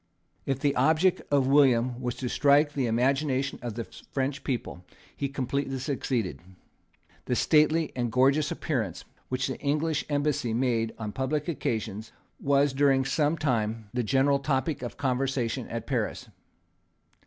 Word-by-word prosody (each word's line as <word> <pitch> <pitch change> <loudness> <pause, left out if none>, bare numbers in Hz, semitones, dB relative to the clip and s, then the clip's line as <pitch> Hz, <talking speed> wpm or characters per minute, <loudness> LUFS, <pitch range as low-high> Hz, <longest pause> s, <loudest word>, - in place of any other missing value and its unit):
If 135 - +1
the 140 0 +1
object 160 +7 +3
of 140 -2 +3
William 130 -3 +3
was 125 -1 -2
to 130 - -4
strike 145 +3 +3
the 135 -4 0
imagination 135 +3 0
of 120 -3 -5
the 115 - -3
French 135 +4 -4
people, 115 -8 -4 0.3
he 140 - -2
completely 135 0 -2
succeeded. 130 -6 -2 0.9
The 125 - 0
stately 155 +3 +3
and 120 -2 -1
gorgeous 135 +5 +3
appearance 115 - -3 0.2
which 130 0 -1
the 130 - -4
English 150 +1 0
embassy 145 -5 0
made 115 -3 +1
on 105 -2 -4
public 135 +5 -2
occasions 110 - -3 0.3
was, 140 0 +2
during 135 -1 +3
some 150 +4 +1
time, 115 -7 -1
the 125 - 0
general 135 +4 +2
topic 140 +1 -1
of 120 - -6
conversation 130 -2 -1
at 115 -1 -5
Paris. 120 -5 -2
135 Hz, 145 wpm, -27 LUFS, 120-145 Hz, 0.9 s, object